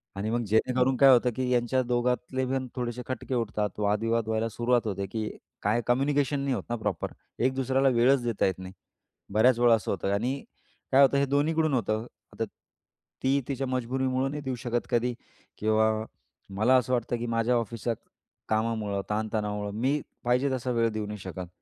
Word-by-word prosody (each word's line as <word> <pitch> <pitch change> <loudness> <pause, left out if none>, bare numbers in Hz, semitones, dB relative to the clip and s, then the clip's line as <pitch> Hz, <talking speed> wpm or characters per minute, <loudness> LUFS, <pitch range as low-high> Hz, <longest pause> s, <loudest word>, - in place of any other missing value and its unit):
आणि 100 +2 -2
मग 120 0 0
जेणेकरून 125 +5 +2
काय 135 +1 +7
होतं 125 -1 +4
की 130 -1 -1
यांच्या 125 +1 +2
दोघातले 125 +1 0
पण 130 0 -1
थोडेसे 120 -1 -3
खटके 130 0 -3
उठतात. 105 -3 -1
वादविवाद 110 +2 +1
व्हायला 110 +1 0
सुरुवात 120 +1 +1
होते 100 -1 -2
की 110 +2 -3 0.3
काय 110 +4 +1
कम्युनिकेशन 140 +3 +2
नाही 140 -1 0
होतं - - -5
ना - - +1
प्रॉपर. 100 -5 -2 0.3
एक 130 +2 +2
दुसऱ्याला 135 +1 +2
वेळच 125 +1 +4
देता 115 -3 0
येत 95 -1 -1
नाही. 95 0 -8 0.6
बऱ्याच 120 +3 +4
वेळा 120 -1 +6
असं 110 - -3
होतं 100 0 -1
आणि 125 +7 -1 0.5
काय 135 +1 +6
होतं 140 0 +5
हे 140 - +3
दोन्हीकडून 155 +3 +1
होतं. 110 -2 0 0.3
आता 115 - -2 0.8
ती 135 +1 +3
तिच्या 135 -1 -2
मजबुरीमुळे 130 +1 0
नाही 145 +1 -5
देऊ 130 -1 -2
शकत 120 -1 -2
कधी 120 0 +1 0.4
किंवा 110 +1 +3 0.6
मला 110 +6 +4
असं 125 0 0
वाटतं 120 0 0
की 120 - -4
माझ्या 115 +1 +1
ऑफिसच्या 115 0 -1 0.6
कामामुळं 110 -2 0
ताण 110 +1 -1
तणावामुळं 105 -1 -2
मी 140 +3 +2 0.2
पाहिजे 125 +3 +2
तसा 130 -1 -2
वेळ 115 -1 +2
देऊ 110 -1 -3
नाही 105 0 -6
शकत. 90 -1 -6
120 Hz, 180 wpm, -28 LUFS, 110-130 Hz, 0.8 s, काय